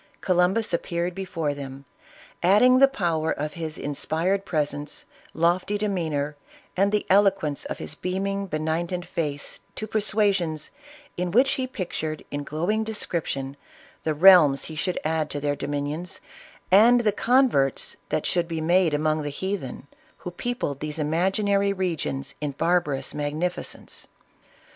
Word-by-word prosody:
Columbus 185 +3 +2
appeared 170 +1 -1
before 175 -6 -2
them, 140 -1 -8 0.6
adding 230 +8 +6
the 275 - +8
power 170 -11 -1
of 150 +1 -3
his 160 -2 -5
inspired 165 +7 -1
presence, 145 -3 -2 0.3
lofty 175 +5 +1
demeanor, 160 -8 -1 0.4
and 195 +2 +2
the 210 0 0
eloquence 190 -7 +2
of - - -4
his - - -6
beaming, 195 +4 -2
benignant 170 +2 -2
face 145 -3 -3 0.2
to 215 - -3
persuasions, 200 -7 0 0.5
in 180 0 -1
which 255 +9 +4
he 260 -1 -1
pictured 160 -8 -4
in 145 0 -3
glowing 175 +10 -1
description 165 -10 -3 0.5
the 155 -1 0
realms 155 -5 +7
he 160 - -7
should 180 +4 -1
add 155 -1 0
to 145 - -3
their 145 0 0
dominions, 145 +5 -3 0.5
and 235 +5 +7
the 215 -3 +2
converts 230 - +2
that - - -1
should 175 -2 +1
be 165 -1 -3
made 170 0 +3
among 155 +1 +1
the 145 - -3
heathen, 145 -4 -4 0.3
who 180 - -7
peopled 175 - -3
these 150 0 -4
imagi 170 +7 0
nary 200 0 +2
regions 165 -7 -2
in 145 -2 -2
barbarous 145 -3 0
magnificence. 150 +5 -4
170 Hz, 140 wpm, -25 LUFS, 150-195 Hz, 0.6 s, the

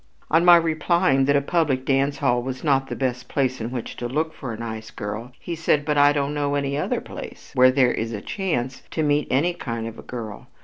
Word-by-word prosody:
On 165 +2 +5
my 175 -1 +9
replying 165 -3 +2
that 140 +1 +3
a 140 - +4
public 140 -5 0
dance 140 +1 +1
hall 120 -2 +1
was 130 +1 -5
not 135 -3 +2
the - - -4
best 125 -2 -2
place 130 -3 0
in 115 - -3
which 125 -2 -5
to 120 - -3
look 155 +5 -1
for 130 -6 -6
a 110 - -6
nice 110 -1 -6
girl, 105 +4 -6
he 175 - -5
said: 155 -3 +1
"But 150 0 +1
I 145 0 +6
don't 145 0 -1
know 145 -1 0
any 140 -1 -1
other 150 - -1
place - - -10
where 130 0 +6
there 130 -1 +3
is 115 +1 -3
a 105 - -4
chance 135 - -3
to 160 - -1
meet 145 -1 +1
any 155 +7 +2
kind 115 -8 -5
of 115 0 -7
a - - -7
girl. 110 -4 -7
135 Hz, 235 wpm, -23 LUFS, 120-150 Hz, -, my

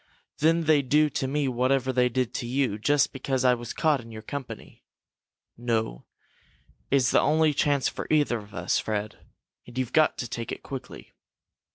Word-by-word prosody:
Then 165 +2 +3
they'd 145 -4 +2
do 150 0 +4
to 130 - -2
me 140 +1 0
whatever 130 +1 +1
they 125 0 +3
did 125 0 -1
to 120 - -4
you, 125 -4 0
just 145 +6 +2
because 135 -1 -1
I 125 - +6
was 120 -1 -5
caught 150 -5 +1
in 115 0 -13
your 110 -1 -9
company. 140 -3 -8 0.7
No, 115 - -2 0.8
it's 130 -2 +3
the - - +4
only 155 0 +3
chance 145 -2 +1
for - - -5
either 145 -6 +2
of 105 0 -14
us, - - 0
Fred, 105 0 -3 0.5
and 120 - -12
you've 130 -1 -2
got 155 - +3
to 125 - -4
take 115 0 -5
it - - -6
quickly." 135 -2 -9
130 Hz, 180 wpm, -26 LUFS, 120-145 Hz, 0.8 s, I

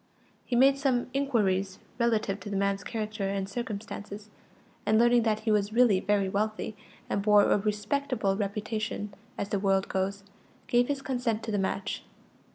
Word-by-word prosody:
He 245 - 0
made 270 +3 +5
some 255 -3 0
inquiries 200 -9 +1 0.2
relative 220 -4 +1
to 200 - -8
the 200 - -3
man's 200 0 0
character 215 -3 -3
and 195 -1 -2
circumstances, 210 -1 -6 0.5
and 215 +1 +3
learning 240 +1 +5
that 220 -1 0
he 220 - 0
was 210 0 +1
really 230 -5 +5
very 200 0 +1
wealthy, 215 +2 -2 0.3
and 200 - -1
bore 210 0 +6
a - - +3
respectable 210 +1 0
reputation, 210 0 -3 0.2
as 200 - -3
the 200 - 0
world 195 -1 +1
goes, 195 +1 -2 0.4
gave 245 -1 +3
his 280 -1 -2
consent 245 -4 -1
to 225 - -3
the 205 - 0
match. 195 0 -2
210 Hz, 165 wpm, -28 LUFS, 200-235 Hz, 0.5 s, bore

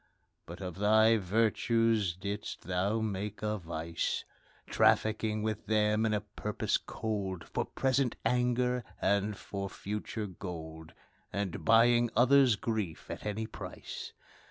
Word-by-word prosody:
But 85 +3 -9
of 90 -2 -5
thy 110 +2 +5
virtues 110 0 +2
didst 100 +3 -5
thou 95 +5 0
make 105 0 -3
a 105 0 -1
vice, 85 -1 -3 0.4
Trafficking 110 0 +2
with 110 -1 -3
them 105 0 +2
in 110 - 0
a 105 - -1
purpose 105 0 -1
cold, 100 -5 -4
For - - -2
present 130 -1 +1
anger, 125 0 +1 0.2
and 100 0 +1
for 100 -1 -5
future 105 +2 -4
gold 80 -4 -8 0.4
And 100 -2 -3
buying 120 +1 +5
others' 130 -1 +6
grief 105 -5 -3
at - - -5
any 105 +2 -2
price. - - -7
105 Hz, 125 wpm, -31 LUFS, 95-115 Hz, 0.4 s, others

